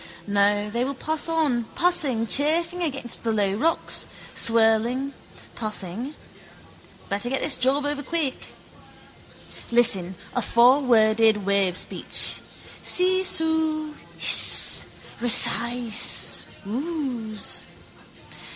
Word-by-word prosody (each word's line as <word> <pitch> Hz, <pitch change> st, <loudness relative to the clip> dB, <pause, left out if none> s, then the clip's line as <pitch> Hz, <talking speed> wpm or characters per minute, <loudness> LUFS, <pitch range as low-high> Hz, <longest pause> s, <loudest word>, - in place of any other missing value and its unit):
No, 205 Hz, 0 st, 0 dB
they 235 Hz, +3 st, -3 dB
will 275 Hz, +2 st, -4 dB
pass 315 Hz, +4 st, -4 dB
on, 295 Hz, -8 st, -1 dB
passing, 290 Hz, -10 st, 0 dB
chafing 330 Hz, +8 st, 0 dB
against 275 Hz, -7 st, -1 dB
the 230 Hz, -, -2 dB
low 205 Hz, -3 st, -1 dB
rocks, 315 Hz, +11 st, -1 dB, 0.3 s
swirling, 230 Hz, +4 st, +1 dB, 0.4 s
passing. 215 Hz, -, -6 dB, 0.9 s
Better 205 Hz, +4 st, -2 dB
get 270 Hz, -, -2 dB
this 295 Hz, -, +2 dB
job 275 Hz, +3 st, 0 dB
over 290 Hz, 0 st, -4 dB
quick. 295 Hz, -2 st, -4 dB, 1.2 s
Listen: 200 Hz, -7 st, +3 dB, 0.2 s
a 245 Hz, -, -1 dB
fourworded 225 Hz, -4 st, +2 dB
wavespeech: 195 Hz, -2 st, -1 dB, 0.4 s
seesoo, 320 Hz, -4 st, +1 dB, 0.3 s
hrss, -, -, +5 dB, 0.4 s
rsseeiss, 235 Hz, 0 st, +4 dB, 0.2 s
ooos. 245 Hz, -3 st, -5 dB
245 Hz, 85 wpm, -22 LUFS, 220-300 Hz, 1.2 s, hrss